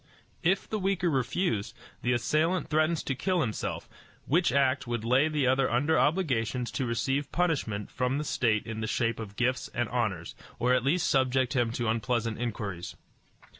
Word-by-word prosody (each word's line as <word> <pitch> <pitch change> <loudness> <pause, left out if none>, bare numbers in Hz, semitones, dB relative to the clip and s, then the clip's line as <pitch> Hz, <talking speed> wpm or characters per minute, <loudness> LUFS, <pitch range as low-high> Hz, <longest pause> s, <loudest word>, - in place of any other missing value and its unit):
If 190 +4 +1
the 215 - -2
weaker 185 -3 +1
refuse, 130 - -1 0.3
the 125 - +1
assailant 155 +9 +1
threatens 155 +1 +2
to 135 - -1
kill 180 +6 0
himself, 110 -7 -3 0.4
which 170 +3 +2
act 135 -1 +2
would 120 -2 -2
lay 130 +6 +4
the 150 -3 0
other 130 +1 +3
under 145 +7 +2
obligations 125 - 0
to 130 - -2
receive 135 +4 -1
punishment 140 - -1
from 125 +2 0
the 150 - -1
state 115 -7 +1
in 110 -1 -5
the 110 - -2
shape 115 0 0
of 105 -3 -7
gifts 125 +3 0
and 120 -1 0
honors, 105 -9 -2 0.2
or 125 +1 +2
at 130 -2 +2
least 160 +6 +2
subject 130 -1 +2
him 120 -2 +2
to 120 -1 -2
unpleasant 115 0 -1
inquiries. 105 -7 -4
125 Hz, 170 wpm, -29 LUFS, 115-150 Hz, 0.4 s, lay